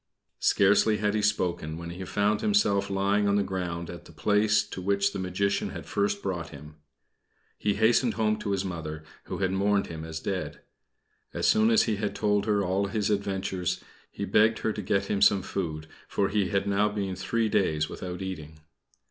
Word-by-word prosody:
Scarcely 105 +2 +4
had 105 -1 0
he 105 - +1
spoken, 90 -6 -1
when 85 0 -6
he 90 +2 -6
found 105 +3 +1
himself 100 - +2
lying 100 +1 +1
on 100 - +3
the 100 - +3
ground 90 -3 -4
at 85 -2 -9
the - - -14
place 105 0 +2
to 95 - -7
which 100 +1 +1
the 100 - -4
Magician 95 +2 -1
had - - -8
first 100 0 -1
brought 90 -4 -3
him. 75 0 -12 0.8
He 105 -1 +1
hastened 115 +2 +3
home 110 -1 +1
to 105 - -4
his 100 -1 0
Mother, 80 -4 -5 0.2
who - - -5
had 95 -1 0
mourned 100 +1 +2
him 80 -1 -7
as 80 0 -5
dead. 95 +2 -4 0.7
As - - -1
soon 110 +1 +4
as 115 - +5
he 110 -3 -1
had 105 0 -2
told 105 0 +1
her 105 -2 +2
all 95 +2 0
his 105 0 -1
adventures, 95 -3 -2 0.3
he - - -5
begged 110 +1 +4
her 110 - +1
to 105 - -4
get 100 +1 0
him 100 - -1
some 100 -2 +5
food, 80 -6 -4 0.2
for 100 -1 0
he 100 -2 +1
had 100 -1 0
now 100 +1 +2
been 100 -3 -3
three 115 +5 0
days 80 -7 +1
without 90 +3 -6
eating. 80 -5 -7
100 Hz, 195 wpm, -27 LUFS, 90-105 Hz, 0.8 s, as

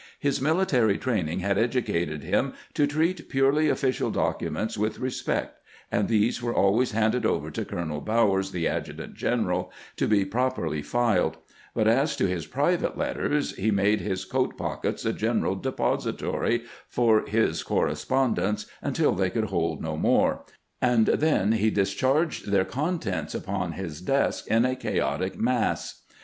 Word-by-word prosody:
His 140 -2 0
military 140 - +2
training 95 -9 -1
had 100 +1 +1
educated 85 - 0
him - - 0 0.2
to 145 - +2
treat 160 +4 -1
purely 140 +3 +3
official 130 -3 0
documents 110 - -1
with 105 +1 -1
respect, 130 0 -3 0.3
and - - +1
these 110 +2 +2
were 120 -1 -2
always 110 +5 +3
handed 110 +3 +1
over - - 0
to - - -3
Colonel 80 -4 -4
Bowers, 100 -4 +2
the 90 -3 -1
adjutant - - -4
general, - - -1 0.3
to - - +1
be 100 -2 +3
properly 110 - -1
filed; 115 0 +1 0.4
but 110 - +2
as 135 +7 +3
to - - +1
his 90 -4 -2
private - - 0
letters, 150 0 -1
he 105 +3 +1
made 100 0 +2
his 95 0 -3
coat - - -1
pockets - - -3
a - - +1
general - - 0
depository 120 0 -1 0.3
for 115 -3 +3
his 105 -7 +1
correspon 130 -2 +1
dence 105 +2 -1 0.2
until - - +1
they 95 0 +1
could 110 +1 -2
hold 85 -4 -1
no 80 -1 -2
more, 80 - +2 0.4
and 120 -3 +4
then 145 -10 +2
he 110 -1 +2
dis 100 -2 +1
charged 140 - +1
their 95 -2 +3
contents 135 - -2
upon - - -3
his 85 -5 -6
desk 135 +9 0
in 115 +2 +3
a 130 0 +1
chaotic 130 - -1
ma'ss. - - -1
110 Hz, 155 wpm, -26 LUFS, 95-130 Hz, 0.4 s, and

